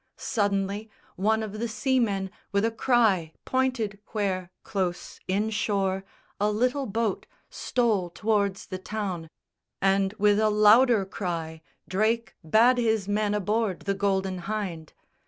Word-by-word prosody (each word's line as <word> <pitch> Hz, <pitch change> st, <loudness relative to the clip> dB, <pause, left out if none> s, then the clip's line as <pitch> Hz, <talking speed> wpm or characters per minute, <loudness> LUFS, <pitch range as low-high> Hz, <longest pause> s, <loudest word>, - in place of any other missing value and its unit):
Suddenly 205 Hz, 0 st, -1 dB, 0.3 s
one 220 Hz, +3 st, +1 dB
of 215 Hz, 0 st, -6 dB
the 235 Hz, -, -1 dB
seamen 215 Hz, -4 st, 0 dB, 0.2 s
with 200 Hz, +1 st, +2 dB
a 230 Hz, -, +1 dB
cry 220 Hz, -9 st, +2 dB
Pointed 255 Hz, -6 st, 0 dB
where, 190 Hz, -4 st, -1 dB
close 185 Hz, -4 st, -3 dB
inshore, 200 Hz, -1 st, 0 dB, 0.4 s
a 210 Hz, +1 st, +2 dB
little 250 Hz, +6 st, 0 dB
boat 220 Hz, 0 st, -1 dB, 0.2 s
Stole 220 Hz, -8 st, 0 dB
towards 200 Hz, 0 st, 0 dB
the 185 Hz, -, -6 dB
town; 190 Hz, -5 st, -4 dB, 0.5 s
and, 195 Hz, 0 st, +2 dB
with 210 Hz, 0 st, +3 dB
a 215 Hz, 0 st, +3 dB
louder 215 Hz, +1 st, +5 dB
cry, 165 Hz, -4 st, -4 dB, 0.3 s
Drake 220 Hz, +4 st, 0 dB
bade 230 Hz, +10 st, +4 dB
his 220 Hz, -4 st, +1 dB
men 210 Hz, 0 st, +1 dB
aboard 210 Hz, -1 st, 0 dB
the 200 Hz, -, -1 dB
Golden 195 Hz, -2 st, 0 dB
Hynde. 180 Hz, -5 st, -4 dB
205 Hz, 125 wpm, -27 LUFS, 190-220 Hz, 0.5 s, louder